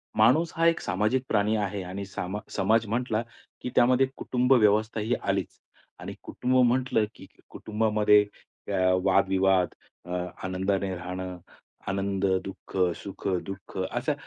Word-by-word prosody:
माणूस 130 Hz, +10 st, +4 dB
हा 165 Hz, -, +2 dB
एक 165 Hz, 0 st, +3 dB
सामाजिक 105 Hz, +8 st, 0 dB
प्राणी 105 Hz, 0 st, +2 dB
आहे, 100 Hz, -2 st, -2 dB
आणि 95 Hz, +2 st, -6 dB
सामा 95 Hz, +1 st, -4 dB, 0.2 s
समाज 110 Hz, +4 st, +3 dB
म्हटला, 115 Hz, 0 st, 0 dB, 0.4 s
की -, -, -3 dB
त्यामध्ये 125 Hz, +2 st, +4 dB
कुटुंब 125 Hz, +1 st, +2 dB
व्यवस्था 110 Hz, -1 st, +3 dB
ही 110 Hz, +3 st, 0 dB
आलीच. -, -, -2 dB, 0.4 s
आणि -, -, -6 dB
कुटुंब 130 Hz, +1 st, -1 dB
म्हटलं, 125 Hz, -3 st, +2 dB
की -, -, -13 dB, 0.2 s
कुटुंबामध्ये 105 Hz, -1 st, +2 dB, 0.5 s
अ, -, -, +1 dB, 0.3 s
वाद-विवाद, 95 Hz, -2 st, +3 dB, 0.3 s
अ, 90 Hz, -, -6 dB, 0.3 s
आनंदाने 95 Hz, +1 st, -1 dB
राहणं, 90 Hz, +1 st, -5 dB, 0.5 s
आनंद, 100 Hz, 0 st, -1 dB, 0.2 s
दुःख, 95 Hz, -, -10 dB, 0.3 s
सुख-दुःख 95 Hz, -1 st, -5 dB
अशा 120 Hz, +10 st, -1 dB
105 Hz, 125 wpm, -27 LUFS, 95-120 Hz, 0.5 s, माणूस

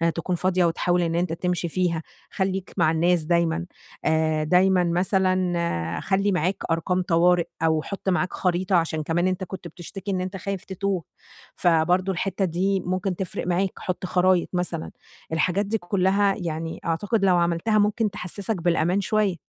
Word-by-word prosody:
تكون 175 Hz, +2 st, -1 dB
فاضية 185 Hz, 0 st, +2 dB
وتحاول 175 Hz, +1 st, +1 dB
إن 165 Hz, -1 st, 0 dB
أنت 175 Hz, -1 st, 0 dB
تمشي 175 Hz, 0 st, -1 dB
فيها، 170 Hz, -2 st, 0 dB, 0.3 s
خلّيك 190 Hz, -1 st, -2 dB
مع 155 Hz, -, +4 dB
الناس 170 Hz, +1 st, +2 dB
دايمًا. 170 Hz, +1 st, +1 dB, 0.4 s
آآ، 155 Hz, -1 st, +2 dB
دايمًا 180 Hz, +3 st, +4 dB
مثلًا 175 Hz, -, 0 dB
خلّي 195 Hz, +1 st, +1 dB
معاك 180 Hz, +2 st, 0 dB
أرقام 180 Hz, +3 st, +1 dB
طوارئ 175 Hz, 0 st, +3 dB, 0.2 s
أو 160 Hz, -1 st, +3 dB
حط 200 Hz, -1 st, -4 dB
معاك 180 Hz, 0 st, 0 dB
خريطة 180 Hz, +1 st, 0 dB
عشان 160 Hz, -2 st, +1 dB
كمان 170 Hz, +3 st, +1 dB
أنت 185 Hz, 0 st, -1 dB
كنت 190 Hz, +1 st, -7 dB
بتشتكي 195 Hz, +3 st, -7 dB
إن 185 Hz, -, -1 dB
أنت 185 Hz, +1 st, -4 dB
خايف 195 Hz, 0 st, -4 dB
تتوه. 190 Hz, -2 st, -2 dB, 0.5 s
فبرضه 175 Hz, +3 st, +2 dB
الحتة 195 Hz, +2 st, -1 dB
دي 190 Hz, +3 st, 0 dB
ممكن 185 Hz, +1 st, -2 dB
تفرق 180 Hz, -1 st, -4 dB
معاك، 185 Hz, +2 st, +1 dB
حط 185 Hz, 0 st, -3 dB
خرايط 180 Hz, 0 st, +2 dB
مثلًا، 175 Hz, -2 st, -2 dB, 0.4 s
الحاجات 180 Hz, +5 st, +1 dB
دي 220 Hz, +3 st, 0 dB
كلها 195 Hz, +1 st, +2 dB
يعني 165 Hz, -2 st, -4 dB
أعتقد 195 Hz, +5 st, 0 dB
لو 180 Hz, -2 st, +4 dB
عملتها 170 Hz, +5 st, +1 dB
ممكن 210 Hz, +1 st, +2 dB
تحسسك 200 Hz, +2 st, -3 dB
بالأمان 175 Hz, +2 st, +1 dB
شوية. 205 Hz, -2 st, +1 dB
180 Hz, 155 wpm, -24 LUFS, 170-190 Hz, 0.5 s, مع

